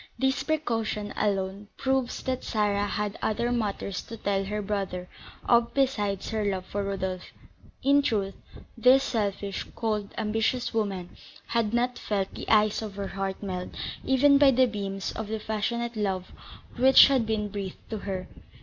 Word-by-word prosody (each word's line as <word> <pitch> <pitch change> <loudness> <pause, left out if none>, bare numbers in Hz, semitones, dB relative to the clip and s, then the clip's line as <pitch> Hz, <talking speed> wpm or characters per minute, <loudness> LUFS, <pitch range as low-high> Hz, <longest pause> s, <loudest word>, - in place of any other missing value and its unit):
This 265 0 +1
precaution 225 -9 -1
alone 195 0 -1
proves 265 -2 0
that 260 -1 -2
Sarah 205 -2 +1
had 210 0 -2
other 235 +3 0
matters 205 -5 -2
to 230 - -7
tell 195 -2 0
her 210 +2 -2
brother 195 -3 -3 0.4
of 235 0 +3
besides 210 -8 0
her 220 -1 0
love 190 -2 -1
for 200 +1 -3
Rodolph. 190 -2 -3 0.5
In 280 +1 +5
truth, 200 -7 0 0.4
this 255 +3 +6
selfish, 200 -5 -2
cold, 215 -3 -2
ambitious 225 +4 0
woman 195 -5 -2 0.3
had 230 -3 +1
not 245 +1 0
felt 195 -2 -2
the - - -7
ice 215 -1 +4
of 210 -3 -6
her 200 -1 -4
heart 195 0 -4
melt 180 -2 -4 0.3
even 280 +2 +5
by 285 -1 +7
the 260 0 +5
beams 195 -4 -3
of 220 - -5
the 220 +1 -2
passionate 230 +2 -2
love 190 -3 -2 0.5
which 260 +2 +9
had 260 -5 +2
been 215 -2 -1
breathed 195 -2 -6
to 220 - -2
her. 190 -2 -4
210 Hz, 160 wpm, -27 LUFS, 195-235 Hz, 0.5 s, which